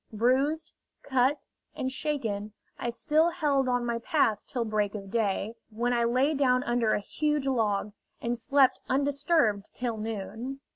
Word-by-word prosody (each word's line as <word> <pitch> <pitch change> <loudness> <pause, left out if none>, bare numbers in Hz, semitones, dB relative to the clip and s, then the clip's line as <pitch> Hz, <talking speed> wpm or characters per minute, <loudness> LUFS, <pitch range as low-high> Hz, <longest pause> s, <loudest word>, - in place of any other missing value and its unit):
Bruised, 260 +8 +1 0.3
cut, 265 +2 +1 0.3
and 260 - -2
shaken, 225 -8 -3 0.3
I 240 - -2
still 300 +8 +2
held 290 -6 +1
on 245 -1 +1
my 235 -1 -1
path 215 -2 +1
till 240 -3 -2
break 215 -1 0
of 195 -2 -7
day, 215 -1 0 0.2
when 235 +3 -1
I 235 -1 +2
lay 255 +6 +2
down 255 -3 +2
under 240 -2 +1
a - - 0
huge 300 +6 -1
log, 210 -6 0 0.3
and 240 0 -1
slept 265 +3 +3
undisturbed 275 -5 +2
till 240 -3 -2
noon. 225 +5 -5
245 Hz, 150 wpm, -28 LUFS, 220-275 Hz, 0.3 s, slept